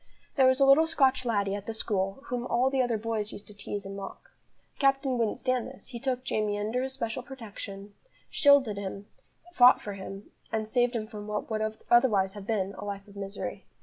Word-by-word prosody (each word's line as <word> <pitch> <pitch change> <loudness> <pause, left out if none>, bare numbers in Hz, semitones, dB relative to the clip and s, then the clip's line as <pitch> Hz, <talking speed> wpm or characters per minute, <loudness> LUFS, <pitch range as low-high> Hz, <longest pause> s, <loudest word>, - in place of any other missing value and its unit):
There 265 -2 +6
was 260 +1 +3
a 275 - +6
little 285 +4 +6
Scotch 265 -5 +2
laddie 200 -4 +1
at 200 0 -5
the 225 - -3
school 195 +2 -2
whom 245 0 -2
all 255 +2 +2
the 270 -1 +2
other 240 -3 +1
boys 215 -1 -2
used 205 - -9
to 210 - -10
tease 205 0 -5
and 195 0 -6
mock. 195 -1 -9 0.4
The - - -32
captain 270 -2 +2
wouldn't 225 -2 +1
stand 255 -2 0
this; 260 0 -12
he 240 -3 -6
took 255 0 -1
Jamie 210 -4 0
under 220 +4 -1
his 265 0 -3
special 230 -2 -3
protection, 210 -6 -9 0.4
shielded 280 -8 +5
him, 200 0 -5 0.5
fought 250 -4 +7
for 205 - -6
him, 195 +1 -8 0.2
and 220 -1 -1
saved 245 +1 +2
him 220 -2 -1
from 210 -1 -8
what 210 +1 -3
would 215 0 -1
otherwise 210 -6 +4
have 205 -1 -9
been 200 -3 0
a - - -6
life 200 0 -5
of 200 - -15
misery. 200 0 -5
220 Hz, 215 wpm, -29 LUFS, 205-255 Hz, 0.5 s, fought